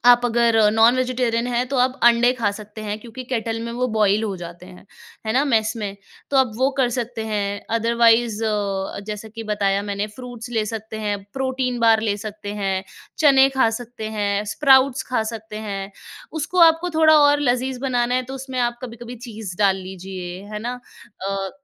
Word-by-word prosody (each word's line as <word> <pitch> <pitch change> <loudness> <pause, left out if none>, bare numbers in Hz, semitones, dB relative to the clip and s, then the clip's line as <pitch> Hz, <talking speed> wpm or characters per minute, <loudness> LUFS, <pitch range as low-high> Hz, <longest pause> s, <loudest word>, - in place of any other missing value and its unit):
आप 245 0 +7
अगर 235 -1 +2 0.2
non 225 +3 +5
vegetarian 245 -2 0
हैं, 245 +1 0
तो 275 - -2
आप 255 +1 +2
अंडे 240 +1 +5
खा 225 -5 0
सकते 215 0 -10
हैं, 210 0 -3
क्योंकि 240 +3 -9
केटल 225 -1 -1
में 235 - -4
वो 250 +1 0
बॉयल 210 0 +3
हो 200 -3 -3
जाते 175 0 -9
हैं, 185 0 -14 0.4
है 220 - 0
ना? 275 +3 +3
मेस 220 -5 +2
में। 205 -3 -4 0.3
तो 275 - +1
आप 260 -3 +3
वो 260 +2 +2
कर 260 -2 +3
सकते 235 -2 -3
हैं। 205 -2 -2 0.2
अदरवाइज 230 -1 +3
अ, 200 -3 -2
जैसा 210 +1 -6
कि 225 +1 -8
बताया 200 -1 +1
मैंने 200 +1 -2
फ्रूट्स 245 -2 -8
ले 215 - +1
सकते 220 0 -6
हैं, 205 -1 -1 0.2
प्रोटीन 260 -2 -1
बार 225 -1 +5
ले 205 - 0
सकते 205 -1 -6
हैं, 190 -1 -1 0.3
चने 270 -3 +6
खा 230 - +5
सकते 230 -2 -7
हैं, 200 0 0
स्प्राउट्स 265 -2 +4
खा 235 -3 +1
सकते 220 -1 -8
हैं। 195 0 -4 0.5
उसको 360 +5 -3
आपको 330 +2 -3
थोड़ा 315 -1 +7
और 290 0 +5
लज़ीज़ 255 -1 0
बनाना 245 -2 0
है 255 - +1
तो - - -4
उसमें 260 -1 -6
आप 240 - -17
कभी-कभी 240 0 -8
चीज़ 210 -5 -7
डाल 195 -2 +4
लीजिए, 185 -1 -7
है 210 - -3
ना? 250 0 -5 0.5
अ, 195 -1 -2
225 Hz, 190 wpm, -22 LUFS, 205-250 Hz, 0.5 s, आप